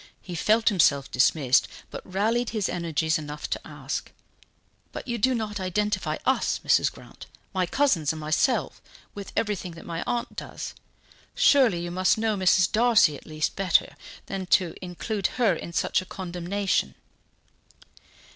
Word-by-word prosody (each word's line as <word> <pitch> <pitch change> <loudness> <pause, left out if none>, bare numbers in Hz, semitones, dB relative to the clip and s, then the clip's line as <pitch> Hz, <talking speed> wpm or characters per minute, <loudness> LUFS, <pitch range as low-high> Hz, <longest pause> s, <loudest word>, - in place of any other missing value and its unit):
He 180 - -9
felt 220 +7 +3
himself 145 -9 +2
dismissed, 130 +1 +3 0.2
but - - -6
rallied 225 +5 +1
his 215 -4 -1
energies 160 -3 -1
enough 150 -1 -6
to - - -1
ask: - - -5 0.8
"But - - -7
you 235 -1 -2
do 255 +4 +3
not 210 -3 -3
identify 185 -3 -1
us, 260 - +1
Mrs. - - +3
Grant, - - -14 0.3
my 185 -2 0
cousins 185 - +2
and 160 - -6
myself, 155 +11 0 0.3
with 200 -1 -8
everything 200 -5 -2
that 165 - -12
my 165 -1 -4
aunt 240 -1 -2
does? - - -6 0.6
Surely 250 - +4
you 175 0 -4
must 185 +3 +2
know 220 -1 0
Mrs. 185 -1 +3
Darcy, 220 -9 +4
at - - -13
least, 155 -1 -2
better 190 -4 +2 0.3
than 190 -1 -5
to 180 -2 +3
include 185 +2 -2
her 230 -6 +3
in 170 - -6
such 170 - +1
a - - -10
condemnation?" 180 - -2
185 Hz, 150 wpm, -26 LUFS, 165-215 Hz, 0.8 s, Surely